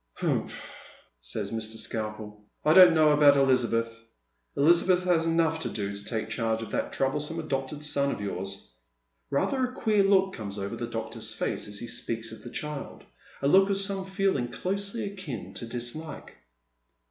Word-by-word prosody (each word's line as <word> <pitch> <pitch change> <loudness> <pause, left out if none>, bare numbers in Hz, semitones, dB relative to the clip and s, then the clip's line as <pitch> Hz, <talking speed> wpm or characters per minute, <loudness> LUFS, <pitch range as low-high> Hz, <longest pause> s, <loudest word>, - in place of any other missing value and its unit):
" - - -49
Humph," - - -2 0.5
says - - -4
Mr. 110 0 -3
Skalpel; 105 -2 -4
" - - -38
I 155 - +5
don't 180 -2 +9
know 155 -1 +5
about 145 -1 +6
Elizabeth. 115 -4 +2 0.6
Elizabeth 175 +4 +4
has 170 -2 +2
enough 165 -1 +2
to - - -3
do 100 -1 -4
to 100 - -8
take 110 +1 -2
charge 115 -1 -1
of 110 - -9
that - - -2
troublesome 150 +4 -1
adopted 145 -1 -3
son 140 -2 +1
of - - -3
yours." 95 -3 -5 0.6
Eather 260 - +1
a 250 - -1
queer 215 -5 +2
look 195 -1 +3
comes 105 -2 -6
over 100 +3 -4
the 120 0 -4
doctor's 115 -1 -3
face - - -2
as 105 0 -3
he 120 - -3
speaks 115 -1 -2
of 110 - -10
the 120 - -9
child 150 +2 -6 0.2
— - - -23
a - - +3
look 195 +6 +5
of 200 - +1
some 195 -1 -1
feeling 190 -10 0
closely 200 - -3
akin 155 - -6
to 115 - -6
disHke. 120 +7 -5
140 Hz, 180 wpm, -28 LUFS, 115-180 Hz, 0.6 s, don't